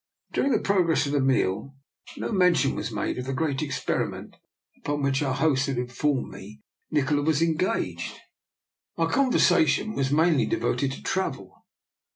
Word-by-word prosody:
During 275 - +1
the - - +4
progress 180 -6 +2
of 140 - -3
the 145 - +1
meal 130 -1 0 0.4
no - - -3
men 180 -4 +4
tion 135 -4 +1
was - - -3
made 105 +3 -2
of 125 - -4
the 135 0 -3
great 145 -2 -1
experiment 145 -3 -3 0.4
upon 145 0 -3
which 135 0 +1
our 135 -3 0
host 135 -2 +2
had 135 -2 -2
informed 125 +3 -1
me 105 +3 -11 0.3
Nikola 145 -1 +1
was 155 +1 +2
engaged. 155 - -1 0.8
Our 165 0 0
conversation 215 - +3
was 135 -6 0
mainly 160 +1 +3
de 340 - 0
voted 140 - 0
to - - -10
travel. 190 0 -3
145 Hz, 165 wpm, -26 LUFS, 135-165 Hz, 0.8 s, the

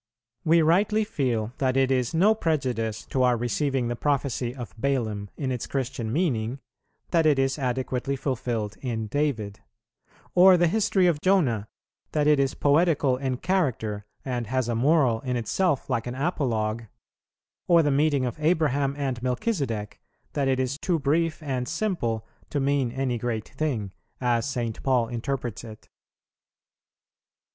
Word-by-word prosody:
We 165 +1 +4
rightly 205 +7 +3
feel 125 - -1
that 130 -1 +1
it 135 0 +3
is 125 -2 +1
no 185 +7 +4
prejudice 125 - -1
to 130 - -1
our 125 -1 +4
receiving 125 +2 0
the 120 - -2
prophecy 130 -3 -1
of 120 -9 -8
Balaam 110 -6 -1
in 135 -3 -2
its 125 -2 -3
Christian 125 -4 -3
meaning, 130 -6 0 0.5
that 165 -2 +4
it 150 -3 +4
is 135 +2 +1
adequately 130 +1 -1
fulfilled 115 -5 -3
in 115 -4 -2
David; 110 -6 -2 0.7
or 180 +1 +7
the 175 - +4
history 195 +1 +2
of 165 -4 +2
Jonah, 135 - +2 0.5
that 150 -1 +2
it 150 -1 +4
is 135 -1 +1
poetical 145 -2 +3
in 130 -1 -2
character 125 - -1 0.2
and 120 -3 -2
has 130 +1 0
a 120 - 0
moral 130 -1 +3
in 125 -2 -2
itself 140 - 0
like 115 -1 -1
an 125 - -4
apologue; 115 -7 -1 0.8
or 170 -1 +6
the 145 - +2
meeting 140 -1 +2
of 125 +4 -4
Abraham 150 -4 +1
and 135 -4 -2
Melchizedek, 125 - -2 0.3
that 140 -2 0
it 130 -1 +1
is 130 +2 -1
too 175 0 +1
brief 160 +3 0
and 130 -4 -2
simple 160 - -1 0.2
to 145 - -1
mean 135 -3 +1
any 130 -2 -1
great 110 -2 -3
thing, 115 -11 -2 0.3
as 120 -1 +1
St. 120 -4 -3
Paul 125 -4 +2
interprets 120 -1 -3
it. 110 -2 -12
130 Hz, 150 wpm, -26 LUFS, 120-150 Hz, 0.8 s, or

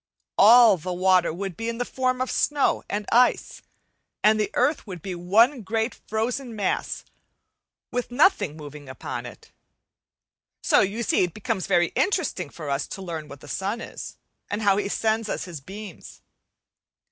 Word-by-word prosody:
All 225 -1 +8
water 180 +1 +2
would 190 +2 -5
be 225 +5 -3
in 230 - -4
the 245 - -1
form 255 0 -1
of 255 - -1
snow 290 -2 +1
and 205 +1 -2
ice, 245 +1 +3 0.6
and 215 +1 +5
the 210 -2 0
earth 270 0 +1
would 180 -5 -8
be 190 - -4
one 220 +10 +3
great 225 +3 -1
frozen 235 +3 -3
mass 200 -3 -2 0.9
with 245 0 -2
nothing 245 - +2
moving 145 -2 -10
upon 130 - -6
it. - - -14 1.1
So - - +4
you 210 +5 0
see - - +2
it 175 -2 -3
becomes 215 -3 -2
very 175 -3 +3
interesting 310 - -1
for 155 0 -9
us 140 0 -1
to 195 - -7
learn 165 -4 -5
what 140 -1 -12
the - - -12
sun 200 +8 -2
is, - - -8 0.3
and 210 +2 -3
how 200 -1 +4
he 205 -1 -1
sends 220 0 0
us - - -2
his 170 -6 -8
beams. 190 - -10
205 Hz, 165 wpm, -25 LUFS, 175-235 Hz, 1.1 s, All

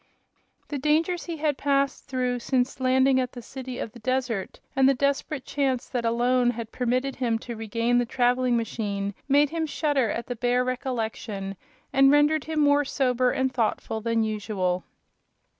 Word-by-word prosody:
The 290 - -3
dangers 320 +5 +1
he 335 -2 -4
had 295 -2 0
passed 275 -1 0
through 250 -2 -1
since 255 +1 0
landing 260 +1 +3
at 255 -1 -2
the 245 - -8
city 260 0 -7
of 225 - -4
the 240 - -13
desert 250 -4 -2 0.2
and 265 0 +5
the 275 - +3
desperate 280 +1 -1
chance 265 -3 -1
that 245 -2 -2
alone 245 +2 +2
had 230 -2 -4
permitted 255 +2 -1
him 235 -3 +1
to 235 +1 -7
regain 230 +2 0
the 245 - +1
traveling 245 0 +2
machine 205 -3 -2
made 285 +1 +4
him 325 -1 -1
shudder 290 -6 +1
at 235 - -3
the 245 - -4
bare 245 +2 +1
recollection 225 -6 -3 0.4
and 270 0 +6
rendered 295 +1 +4
him 315 -1 0
more 290 0 +4
sober 255 -2 +1
and 260 0 0
thoughtful 220 -1 -1
than 230 0 +1
usual. 205 -4 -1
255 Hz, 170 wpm, -26 LUFS, 230-275 Hz, 0.4 s, and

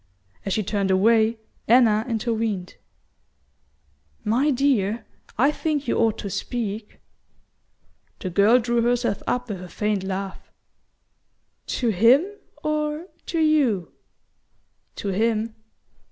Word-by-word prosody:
As 195 - -1
she 215 - 0
turned 200 -1 -1
away, 220 +4 +3 0.3
Anna 225 -2 +5
intervened. 220 -4 -2 1.5
"My 250 +8 +2
dear, 240 -6 +1 0.3
I 270 +6 +4
think 300 -3 -2
you - - +1
ought 225 -2 +2
to 200 - -5
speak." 215 -2 -4 1.2
The 185 - -4
girl 205 +6 +5
drew 240 -1 +1
herself 240 -3 0
up 245 0 -1
with 200 -5 -5
a 180 - -9
faint 210 -1 -1
laugh. 195 0 -5 1.2
"To 240 - 0
him 230 - +5 0.4
or 305 +3 -2 0.2
to 330 - -1
YOU?" 285 - +2 1.0
"To 200 - -4
him." 220 +2 0
225 Hz, 110 wpm, -24 LUFS, 205-250 Hz, 1.5 s, Anna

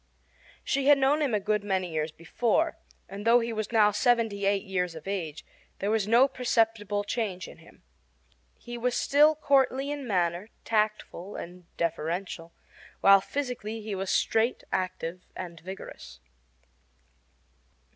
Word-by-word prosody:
She 275 0 0
had 290 -1 +8
known 275 +3 +2
him 270 -7 +1
a - - +2
good 210 +1 0
many 190 -3 -1
years 155 0 -2
before; 235 - 0 0.3
and, 200 +1 -7
though 230 +2 +6
he 230 0 -3
was 215 0 -3
now 215 -2 +5
seventy 215 -2 +1
eight 200 -1 +1
years 180 -3 -2
of 160 +3 -10
age, 170 -6 -4 0.3
there 200 +2 -1
was 220 -2 +1
no 240 +5 +6
perceptible 225 -5 0
change 205 -4 -3
in - - -13
him. - - -19 0.7
He 240 0 -8
was 245 +1 0
still 300 +2 +4
courtly 275 -1 +2
in 285 -3 -5
manner, 180 0 0 0.2
tactful, 215 -3 -1
and 180 +1 -8
deferential, 170 +1 -3 0.5
while 195 0 +7
physically 240 -4 -4
he 210 -1 -5
was 190 0 -3
straight, 225 +3 +1
active, 185 -1 -3
and 170 -2 -7
vigorous. 185 - -9
210 Hz, 145 wpm, -28 LUFS, 185-240 Hz, 0.7 s, had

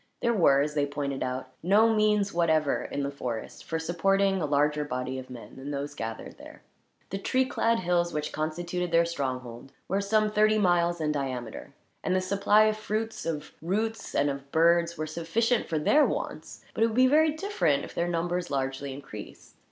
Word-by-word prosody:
There 235 -1 +3
were, 140 -9 +4
as 150 +1 -1
they 145 -1 +1
pointed 140 -1 -3
out, 130 0 -3
no 210 +6 +4
means 210 -2 +2
whatever 160 -4 +1
in 145 - -3
the 140 - -2
forest 120 -5 -6
for 160 - -2
supporting 195 +4 +1
a 155 - 0
larger 150 +1 +2
body 130 -2 -3
of 130 - -10
men 125 0 -11
than 135 +2 -7
those 145 0 -4
gathered 115 -5 -6
there. - - -13 0.5
The 195 - -3
tree 260 +6 +1
clad 230 -4 +1
hills 175 -1 +1
which 150 0 -3
constituted 175 +3 -3
their 170 0 +4
stronghold 130 -5 -5
were 195 +2 0
some 215 +1 +2
thirty 215 0 +3
miles 175 -3 +2
in 150 -1 +1
diameter; 130 -6 -5 0.3
and 185 - +1
the - - +3
supply 200 +3 +3
of 215 0 +2
fruits, 215 -1 -3
of 155 -3 -4
roots, 220 +7 -2
and 145 0 +2
of 140 0 -8
birds 170 +1 +3
were 155 - -2
sufficient 195 +10 0
for 160 - -1
their 290 - +4
wants; - - -4
but - - +1
it - - +5
would 220 - -4
be 255 +1 +6
very 305 +3 +4
different, 310 - 0
were - - -7
their 170 - -2
numbers 175 +1 -1
largely 135 0 -2
increased. 105 -7 -10
170 Hz, 190 wpm, -28 LUFS, 140-200 Hz, 0.5 s, be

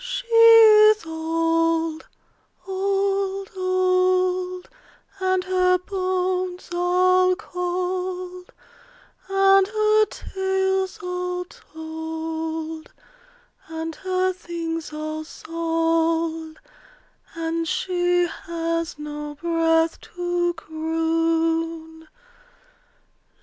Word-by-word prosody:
She - - -4
is 445 -2 +7
old, 330 0 0 0.6
old, 390 0 -1
old; 370 0 +1 0.5
And 375 -1 +1
her 365 -1 +2
bones 370 -1 -2
all 365 +1 +3
cold, 360 0 -4 0.8
And 390 0 +4
her 430 0 +3
tales 380 0 -2
all 360 0 -3
told, 320 -1 -6 0.8
And 325 0 -5
her 370 0 0
things 330 -3 -5
all 310 +1 -5
sold, 330 0 -1 0.8
And 330 0 -2
she 355 +1 +1
has 335 -1 -4
no 295 0 -6
breath 325 0 +1
to 350 0 0
croon. 325 0 -1
355 Hz, 70 wpm, -23 LUFS, 325-370 Hz, 0.8 s, is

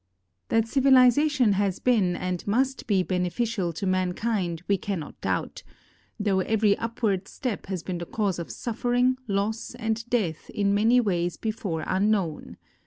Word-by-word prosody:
That 225 0 +2
civilization 265 -1 +4
has 195 -1 0
been 205 -8 +2
and 180 +1 -4
must 265 +6 0
be 195 -4 +2
beneficial 185 +2 -1
to 195 +5 -4
mankind 185 -1 -1
we 200 - +3
cannot 185 -7 -5
doubt, - - -2 0.6
though 200 -2 +1
every 210 +1 +2
upward 215 -4 -1
step 250 -8 -4
has 185 -3 -4
been 180 -2 -4
the 170 - -6
cause 200 -5 -1
of 170 - -6
suffering, 245 +2 0
loss, 210 +4 -2
and 225 -1 -2
death 195 -11 -1
in 200 -1 0
many 225 +5 +4
ways 175 -6 0
before 205 -7 -3
unknown. 190 -4 0
205 Hz, 145 wpm, -26 LUFS, 185-230 Hz, 0.6 s, civilization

